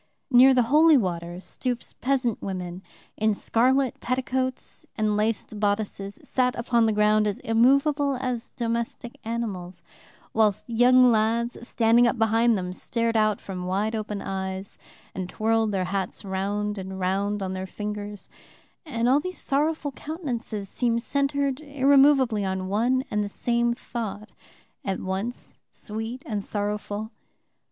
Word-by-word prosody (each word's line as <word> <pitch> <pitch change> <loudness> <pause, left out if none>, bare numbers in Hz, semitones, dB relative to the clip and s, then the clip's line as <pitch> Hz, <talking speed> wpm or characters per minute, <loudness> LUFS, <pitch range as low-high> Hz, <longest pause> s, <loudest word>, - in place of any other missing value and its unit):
Near 255 +2 +8
the 250 - +4
holy 305 +5 +6
water 175 -4 -2
stoups 245 +5 -4
peasant 250 -4 0
women, 180 -2 -5 0.4
in 215 -1 +2
scarlet 255 +4 +1
petticoats 255 0 -2
and 215 -1 +1
laced 215 0 -1
bodices, 205 -1 -1
sat 250 -1 +1
upon 235 -1 +2
the - - +2
ground 210 0 +3
as 205 - -1
immovable 275 +5 +3
as 250 -2 -3
domestic 235 0 -4
animals, 190 -7 -4 0.5
whilst 215 -3 +2
young 250 +2 +5
lads, 230 +2 +1
standing 235 0 +4
up 240 - 0
behind 225 +1 +3
them, 180 -1 -4
stared 230 +4 -1
out 215 -2 +2
from 180 -2 -6
wide 205 +4 0
open 210 -2 -3
eyes 190 0 -5 0.3
and 185 -1 -4
twirled 225 +1 +1
their 190 -2 0
hats 195 +2 -3
round 200 +2 -2
and 190 0 -6
round 195 +2 0
on 190 0 -3
their 190 0 -4
fingers, 210 0 -6 0.6
and 235 -4 0
all 265 +3 +5
these 365 +4 -5
sorrowful 295 +1 0
countenances 245 - -5
seemed 235 +2 0
centred 280 -1 0
irremovably 275 -5 +4
on 190 -1 -2
one 245 +6 +2
and 210 0 +1
the 205 - -4
same 235 +3 0
thought, 225 -3 -5 0.5
at 195 -1 -2
once 195 +6 -5
sweet 225 +4 -6
and 210 -3 -3
sorrowful. 210 +1 -3
225 Hz, 140 wpm, -25 LUFS, 200-250 Hz, 0.6 s, Near